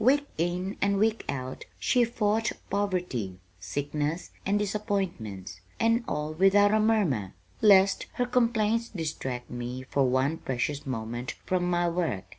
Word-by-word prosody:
"Week 285 +4 +4
in 175 +4 -1
and 200 0 +2
week 220 +2 +2
out 130 -1 -4
she 250 -2 +3
fought 225 -1 0 0.2
poverty, 180 - -1 0.2
sickness, 145 - -3 0.2
and 200 +1 +3
disappointments, 185 - -3 0.2
and 230 +1 +3
all 150 +1 -2
without 195 +4 +5
a 215 - +4
murmur, 185 - +1 0.3
lest 195 -2 +5
her 245 - 0
complaints 230 -2 +1
distract 140 -8 -4
me 120 +1 -5
for 130 0 +1
one 130 +5 +1
precious 135 +3 -2
moment 120 0 -4
from 180 -1 0
my 175 0 +2
work. 170 - -1
175 Hz, 135 wpm, -28 LUFS, 130-210 Hz, 0.3 s, without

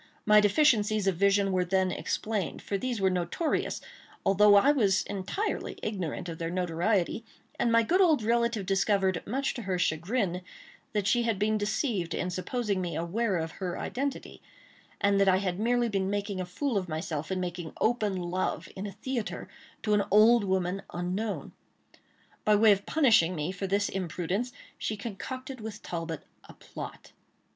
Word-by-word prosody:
My 210 0 +7
deficiencies 215 -2 +3
of 195 -2 +2
vision 200 +1 +3
were 185 -1 +2
then 185 +1 +1
explained; 210 -5 -3
for 200 - -3
these 240 +2 -2
were 190 -1 +3
notorious, 180 - -1 0.4
although 205 +1 +6
I 235 +8 +6
was 200 -9 +2
entirely 205 - -3
ignorant 185 -4 -3
of 165 -1 -6
their 165 0 -2
notoriety, 180 +4 0 0.4
and 235 - +2
my 230 0 +5
good 360 - +3
old 315 - +4
relative 235 -2 +1
discovered, 195 -1 +1
much 265 +5 -1
to 240 - -6
her 190 -3 -1
chagrin, 180 +3 0 0.5
that 210 -2 0
she 240 +4 +3
had 230 -3 0
been 215 +2 +1
deceived 210 - -1
in 180 - -2
supposing 200 +2 -2
me 175 -3 -3
aware 185 +5 0
of 160 0 -3
her 180 -2 -2
identity, 275 +1 -4 0.6
and 200 0 +3
that 195 - +5
I 185 - +5
had 185 -2 -2
been 215 - -2
merely 240 -4 +2
making 200 0 -2
a 180 - -5
fool 230 +4 -1
of 185 -2 -7
myself 160 0 -3
in 190 - 0
making 175 -3 -4
open 215 -4 +1
love, 180 +1 -2
in 195 +2 -4
a - - -6
theatre, 250 +1 -4 0.4
to 210 - +1
an 210 - +4
old 220 +3 +6
woman 190 0 0
unknown. 185 +5 -3 0.9
By 210 - +4
way 215 +1 +6
of 200 0 +1
punishing 220 - +4
me 155 +2 -2
for 190 +1 -4
this 200 +2 +1
imprudence, 185 +5 -2 0.3
she 215 - -2
concocted 255 +5 -6
with 215 0 -7
Talbot 165 -2 -4 0.2
a - - -14
plot. - - -9
200 Hz, 170 wpm, -29 LUFS, 180-225 Hz, 0.9 s, My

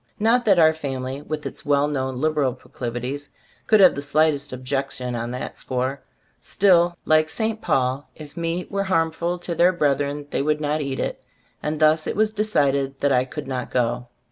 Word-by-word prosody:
Not 235 +3 +3
that 200 -4 +5
our 160 -1 +6
family, 135 -3 -4
with 150 0 -5
its - - -7
well 145 0 +2
known 130 -3 -2
liberal 150 -4 +1
proclivities, 125 +3 -5 0.4
could 215 - +5
have 185 -2 +7
the 140 - -4
slightest 145 0 +1
objection 130 -1 -3
on 120 0 -3
that 125 +1 -6
score; 130 +2 -2 0.4
still, 175 -3 +3
like 155 0 +3
St. 220 +2 -2
Paul, 130 +2 0
if 150 -2 -11
meat 170 +1 -3
were 200 0 -1
harm 165 -4 +2
ful 170 +2 -2
to 175 0 -5
their 175 +2 +4
brethren 145 -3 0
they - - 0
would 150 +1 +1
not 150 0 -1
eat 135 -2 -3
it, - - -3 0.4
and 150 0 -2
thus 155 0 +3
it - - -2
was 215 +1 +2
decided 140 -11 0
that 140 - +2
I 125 -1 +3
could 145 +2 -7
not 130 -2 -3
go. 120 0 -1
145 Hz, 190 wpm, -23 LUFS, 135-170 Hz, 0.4 s, have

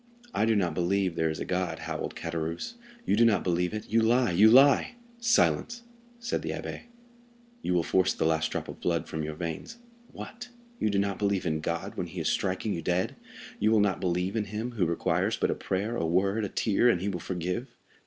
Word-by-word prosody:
"I - - +2
do 115 0 +3
not 90 -5 +1
believe 90 +2 +1
there 80 0 +1
is 80 - -4
a - - -3
God," 90 -1 -1
howled - - -5
Caderousse; 85 - -4 0.3
"you - - +2
do 115 - +4
not 115 -3 +3
believe 90 0 0
it; 105 0 -5
you 115 +1 +3
lie—you 110 -3 +5
lie!" 140 - +6 0.2
"Silence," 235 0 +2 0.3
said 235 0 -2
the - - -5
abbé; - - -5 0.8
"you 90 - 0
will 85 - +2
force 95 +2 +2
the - - -1
last 80 0 +1
drop - - -3
of - - -9
blood 85 -2 0
from 80 - -4
your 75 0 -4
veins. 85 - -5 0.3
What! 245 +3 -9 0.3
you - - +1
do 100 - 0
not 100 -1 0
believe 100 -2 0
in 80 -2 0
God 85 +2 -4
when - - -2
he - - -7
is - - 0
striking 95 +3 -1
you 85 - -3
dead? 90 +3 0 0.4
you 110 - +3
will 110 - +5
not 100 -2 +1
believe 90 +2 -1
in 110 -2 0
him, 110 +4 -4
who 100 -8 0
requires 85 - 0
but - - +1
a - - +2
prayer, 105 +5 -2
a 120 - -1
word, 100 +5 +1
a - - -4
tear, 110 +5 +2
and 90 - +2
he 95 - -3
will 95 -3 -2
forgive? 90 +8 -3
95 Hz, 215 wpm, -28 LUFS, 85-110 Hz, 0.8 s, lie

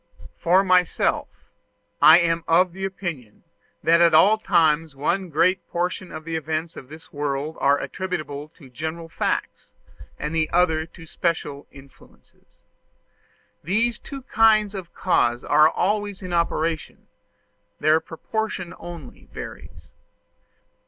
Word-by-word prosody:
For 185 +3 +3
myself, 180 -2 +2 0.7
I 160 +2 +9
am 165 -1 +1
of 175 +2 +3
opinion 175 - -6 0.4
that 170 +1 +4
at 170 -2 +5
all 205 +7 +6
times 160 -6 +2
one 175 +7 -1
great 180 +5 +2
portion 180 +1 -3
of 155 - -7
the 165 -1 -4
events 160 +1 -3
of 130 - -11
this 155 +2 -14
world 145 +1 -3
are 140 +1 +3
attributable 155 -6 -5
to 145 - -15
general 160 +5 -6
facts, - - -3 0.5
and 150 +2 -4
another 160 0 +1
to 165 -1 -14
special 155 -4 -3
influences. 135 -1 -20 1.0
These 220 +7 0
two 275 -2 -9
kinds 215 -4 +3
of 185 -4 -7
cause 120 -10 +1
are 150 +1 +5
always 205 +2 -2
in 180 -1 -5
operation: 165 -1 -2 0.7
their 155 +1 +4
proportion 185 +2 -5
only 170 -7 -10
varies. - - -10
165 Hz, 120 wpm, -23 LUFS, 155-185 Hz, 1.0 s, I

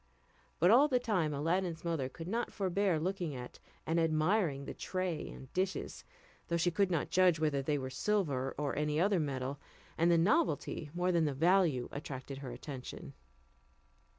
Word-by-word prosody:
But 175 +4 +5
all 265 +6 +7
the 260 -4 +2
time 195 -11 0
Aladdin's 165 +3 -1
mother 160 -6 -1
could 165 +5 -9
not 230 +5 -2
forbear 190 -3 +1
looking 175 -3 -2
at 125 -1 -8 0.3
and 165 +1 +1
admiring 160 -2 +1
the - - -5
tray 185 -4 -3
and 130 - -11
dishes, 190 +1 -2 0.4
though 170 - 0
she 175 +1 +2
could 200 +2 +2
not 165 -5 -1
judge 180 -3 +4
whether 150 -3 +1
they 145 +2 0
were 130 -1 -4
silver 140 -6 0
or 145 -1 -1
any 150 0 0
other 195 +1 +3
metal, 135 -2 -3 0.4
and 170 +1 +4
the 170 - +5
novelty 185 - +1
more 180 +1 +1
than 170 -2 +3
the 145 -2 -1
value 165 -4 +3
attracted 135 -1 -6
her 135 -2 -6
attention. 125 +1 -8
165 Hz, 170 wpm, -33 LUFS, 140-185 Hz, 0.4 s, all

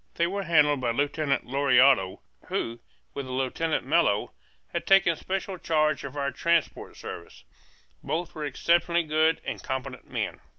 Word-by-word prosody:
They 170 - +2
were 195 +3 -2
handled 150 -6 +3
by 120 - 0
Lieutenant 145 +3 0
Lauriado, 130 -6 +3 0.3
who, 115 +1 -3 0.3
with 140 -2 -5
Lieutenant 130 +4 -1
Mello, 140 -9 +2 0.4
had - - -3
taken 195 -4 +5
special 190 +2 -4
charge 155 -2 +1
of 140 +1 -7
our 140 0 -1
transport 170 -2 -1
service; 85 -7 -9 0.6
both 165 +4 -3
were 155 - -6
exceptionally 170 +4 +1
good 155 +1 +2
and - - -4
competent 130 -1 -5
men. - - -3
150 Hz, 140 wpm, -27 LUFS, 130-170 Hz, 0.6 s, taken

